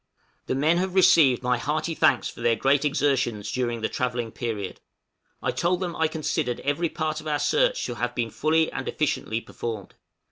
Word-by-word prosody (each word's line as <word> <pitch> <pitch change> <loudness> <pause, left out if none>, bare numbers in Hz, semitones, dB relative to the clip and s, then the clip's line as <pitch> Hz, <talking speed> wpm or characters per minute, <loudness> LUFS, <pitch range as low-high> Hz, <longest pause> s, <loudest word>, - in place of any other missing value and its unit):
The - - 0
men 155 +5 +3
have 185 +1 -1
received 150 -9 +5
my 125 -1 +1
hearty 155 +5 -1
thanks 135 -5 +3
for - - -9
their 115 -1 +3
great 135 +5 +2
exertions 135 -7 0
during 120 -2 -2
the 110 - +1
travelling 120 -2 -2
period. 105 -6 -4 0.6
I - - +1
told 175 +1 0
them 180 -3 -3
I 160 - +2
considered 155 -6 -2
every 145 +4 0
part 155 -1 -3
of 155 - -9
our 150 -1 +1
search - - +1
to - - -3
have 125 0 -3
been 115 -2 -1
fully 160 +5 +1
and 135 - -5
efficiently 115 -6 -1
performed. 110 -5 -6
140 Hz, 185 wpm, -25 LUFS, 120-160 Hz, 0.6 s, received